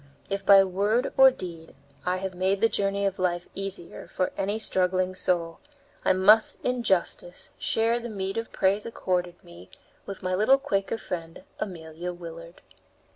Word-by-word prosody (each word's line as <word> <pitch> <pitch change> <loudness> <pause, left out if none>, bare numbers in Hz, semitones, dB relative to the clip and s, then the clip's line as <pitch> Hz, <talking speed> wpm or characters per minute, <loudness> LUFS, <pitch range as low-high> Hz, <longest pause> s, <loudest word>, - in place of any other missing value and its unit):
If 200 0 -2
by 195 -1 +8
word 205 +6 0
or 265 0 +9
deed 170 - -8 0.3
I 180 +1 +1
have 190 0 -4
made 190 +2 0
the 225 - +4
journey 200 -2 -1
of 195 -1 -1
life 175 -1 -1
easier 195 -3 -6
for 185 - -1
any 200 +2 -1
struggling 185 -3 0
soul, 170 -3 -1 0.4
I - - +3
must 205 +4 +5
in 250 -1 0
justice 180 -3 -1
share 230 +1 +1
the 240 0 -6
meed 195 -2 -4
of 230 - -7
praise 200 +3 +1
accorded 180 -5 -2
me 85 +2 -14 0.4
with 195 -1 -7
my 185 0 -1
little 215 +8 +5
Quaker 225 -6 -1
friend 165 -3 -6 0.2
Amelia 170 -1 -5
Willard. 170 0 -10
190 Hz, 160 wpm, -26 LUFS, 175-205 Hz, 0.4 s, or